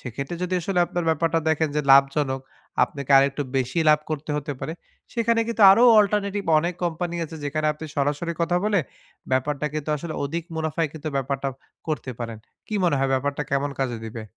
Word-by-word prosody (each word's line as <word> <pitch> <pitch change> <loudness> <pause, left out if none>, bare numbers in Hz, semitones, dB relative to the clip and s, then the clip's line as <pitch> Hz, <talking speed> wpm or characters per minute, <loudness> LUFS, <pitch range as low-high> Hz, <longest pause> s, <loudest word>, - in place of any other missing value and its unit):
সেক্ষেত্রে 135 +6 -5
যদি 180 0 -1
আসলে 180 +2 -1
আপনার 175 -1 -3
ব্যাপারটা 165 +1 +2
দেখেন 160 0 +2
যে - - +3
লাভজনক, 135 0 +4 0.4
আপনাকে 140 -1 -8
আরেকটু 140 +1 +2
বেশি 130 +4 -1
লাভ 150 0 +5
করতে 155 0 -4
হতে 145 0 -3
পারে। 160 - -4 0.4
সেখানে 230 -1 +1
কিন্তু 225 -2 0
আরও 230 - +4 0.2
alternative 205 -1 0
অনেক 175 +2 -1
company 175 +1 -2
আছে, 160 +1 -8
যেখানে 155 +2 -1
আপনি 150 +1 -9
সরাসরি 145 +4 0
কথা 170 +1 +1
বলে, 210 -1 +2 0.5
ব্যাপারটা 140 +3 0
কিন্তু 155 0 -4
আসলে 160 +2 -6
অধিক 165 +4 -3
মুনাফায় 160 0 -1
কিন্তু 155 0 -6
ব্যাপারটা 135 0 -1 0.4
করতে 150 -4 -2
পারেন। 115 -2 -5 0.3
কি 215 - -5
মনে 165 -5 +3
হয়, 135 0 +1
ব্যাপারটা 140 +2 -1
কেমন 140 +1 0
কাজে 120 -4 -1
দিবে? 110 0 -6
150 Hz, 180 wpm, -24 LUFS, 140-170 Hz, 0.5 s, লাভ